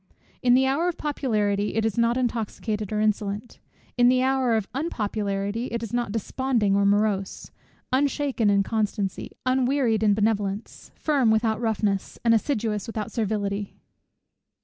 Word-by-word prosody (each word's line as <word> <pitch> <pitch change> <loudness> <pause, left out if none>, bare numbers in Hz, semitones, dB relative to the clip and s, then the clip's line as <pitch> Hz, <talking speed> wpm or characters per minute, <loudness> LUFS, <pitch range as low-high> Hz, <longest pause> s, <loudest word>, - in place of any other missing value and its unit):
In 245 -1 +5
the 265 +1 +4
hour 280 +6 +1
of 350 - -2
popularity 210 -9 -1
it 225 0 +1
is 220 -3 0
not 235 +1 +2
intoxicated, 220 -3 -2
or 210 - 0
insolent; 210 +1 -1 0.4
in 245 0 +6
the 255 0 +3
hour 260 -3 +2
of 205 -3 -3
unpopularity, 210 -5 -2
it 235 0 -4
is 225 - -6
not 240 -3 -1
desponding 225 -1 0
or 200 0 +3
morose; 200 -1 0 0.4
unshaken 275 -4 +1
in 200 -1 +3
constancy, 205 -3 -2
unwearied 255 -3 +2
in 210 -2 +4
benevolence, 205 -1 -2
firm 280 -7 +2
without 220 0 +1
roughness, 210 -4 -1
and 230 - +5
assiduous 220 -3 0
without 215 -2 -4
servility. 205 -2 -2
220 Hz, 145 wpm, -25 LUFS, 205-250 Hz, 0.4 s, in